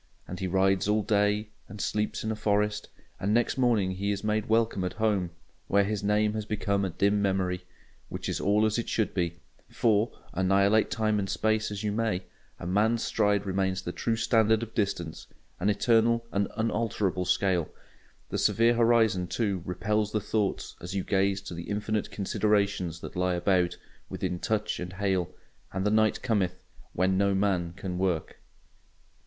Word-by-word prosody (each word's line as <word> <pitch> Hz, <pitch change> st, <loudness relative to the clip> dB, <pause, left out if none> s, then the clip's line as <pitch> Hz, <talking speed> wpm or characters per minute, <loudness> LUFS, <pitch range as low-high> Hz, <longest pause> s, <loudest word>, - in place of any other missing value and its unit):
And 90 Hz, -, -6 dB
he 95 Hz, -, -2 dB
rides 95 Hz, +1 st, +2 dB
all 105 Hz, 0 st, +2 dB
day, 105 Hz, +1 st, +1 dB, 0.2 s
and 105 Hz, -, -9 dB
sleeps 105 Hz, +1 st, -1 dB
in 110 Hz, -, -1 dB
a -, -, -2 dB
forest; 105 Hz, 0 st, 0 dB, 0.3 s
and 100 Hz, +4 st, +1 dB
next 120 Hz, -1 st, +2 dB
morning 115 Hz, -7 st, +2 dB
he 95 Hz, +2 st, -2 dB
is 100 Hz, 0 st, -2 dB
made 105 Hz, 0 st, 0 dB
welcome 110 Hz, -3 st, +2 dB
at 90 Hz, -, -2 dB
home, 105 Hz, -5 st, 0 dB, 0.4 s
where 100 Hz, +1 st, +3 dB
his 105 Hz, 0 st, -2 dB
name 105 Hz, +1 st, +2 dB
has 110 Hz, -1 st, -2 dB
become 100 Hz, -1 st, -1 dB
a 95 Hz, -, 0 dB
dim 100 Hz, +4 st, +1 dB
memory. 95 Hz, -2 st, 0 dB, 0.4 s
Which -, -, -5 dB
is -, -, -2 dB
all 105 Hz, +2 st, +3 dB
as 110 Hz, +2 st, +1 dB
it 115 Hz, -, -3 dB
should 110 Hz, -, 0 dB
be; 85 Hz, -2 st, -1 dB, 0.3 s
for, 110 Hz, -1 st, +2 dB, 0.2 s
annihilate 100 Hz, +4 st, +3 dB
time 110 Hz, 0 st, +1 dB
and 95 Hz, -1 st, -2 dB
space 110 Hz, 0 st, +1 dB
as 105 Hz, 0 st, -5 dB
you 105 Hz, -, 0 dB
may, 105 Hz, -4 st, -1 dB, 0.3 s
a -, -, -8 dB
man's 110 Hz, +5 st, +2 dB
stride 105 Hz, -2 st, +1 dB
remains 95 Hz, -1 st, -1 dB
the 85 Hz, -, -3 dB
true 115 Hz, +5 st, -1 dB
standard 110 Hz, -1 st, +3 dB
of 115 Hz, -, -8 dB
distance; 95 Hz, -6 st, -2 dB, 0.3 s
an 100 Hz, -, +1 dB
eternal 115 Hz, +2 st, +3 dB
and 100 Hz, 0 st, +1 dB
unalterable 105 Hz, -5 st, 0 dB
scale. 90 Hz, -2 st, +1 dB, 0.6 s
The -, -, -2 dB
severe 115 Hz, +1 st, +4 dB
horizon, 115 Hz, -6 st, +3 dB
too, 100 Hz, -2 st, -1 dB
repels 105 Hz, +4 st, -1 dB
the 105 Hz, -, +2 dB
thoughts 105 Hz, -1 st, -2 dB
as 90 Hz, +3 st, -6 dB
you 95 Hz, -, 0 dB
gaze 95 Hz, -1 st, +1 dB
to 95 Hz, -, -7 dB
the 85 Hz, +2 st, -7 dB
infinite 105 Hz, 0 st, -1 dB
considerations 100 Hz, -4 st, 0 dB
that -, -, -8 dB
lie 90 Hz, 0 st, +1 dB
about, 90 Hz, -1 st, +1 dB, 0.3 s
within 90 Hz, -, -3 dB
touch 110 Hz, +2 st, -1 dB
and 90 Hz, +1 st, -5 dB
hail; 95 Hz, -2 st, 0 dB, 0.4 s
and 95 Hz, +1 st, -2 dB
the 105 Hz, -, +2 dB
night 110 Hz, 0 st, +2 dB
cometh, 95 Hz, -6 st, 0 dB, 0.3 s
when 95 Hz, +1 st, +2 dB
no 100 Hz, 0 st, +2 dB
man 95 Hz, -4 st, 0 dB
can 90 Hz, -2 st, -4 dB
work. 90 Hz, -4 st, -1 dB
100 Hz, 175 wpm, -28 LUFS, 95-110 Hz, 0.6 s, severe